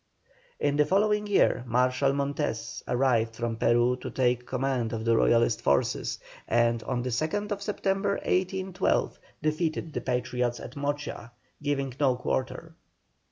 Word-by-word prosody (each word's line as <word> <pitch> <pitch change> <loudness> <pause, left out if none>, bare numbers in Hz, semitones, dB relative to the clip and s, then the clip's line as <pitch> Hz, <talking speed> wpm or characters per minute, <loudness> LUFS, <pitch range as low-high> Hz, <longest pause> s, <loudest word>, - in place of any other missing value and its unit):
In 145 0 +1
the 150 - +4
following 210 +2 +2
year 195 -10 +3
Marshal 125 +3 +2
Montes 140 -3 -2
arrived 120 -3 +1
from 115 -1 -3
Peru 120 +2 +3
to - - -6
take 125 -1 0
command 130 -3 -1
of 110 0 -3
the 115 0 +4
Royalist 115 0 +3
forces, 70 0 +1 0.3
and 115 0 +2
on 120 0 -2
the 125 - -2
2nd 200 - -1
September, 200 -1 0
1812, 185 0 0 0.2
defeated 155 0 -1
the - - -2
Patriots 125 -1 -1
at 125 - -9
Mocha, 145 -4 -4 0.3
giving 140 -3 -1
no 135 -4 +3
quarter. 130 +6 -3
130 Hz, 135 wpm, -28 LUFS, 120-155 Hz, 0.3 s, the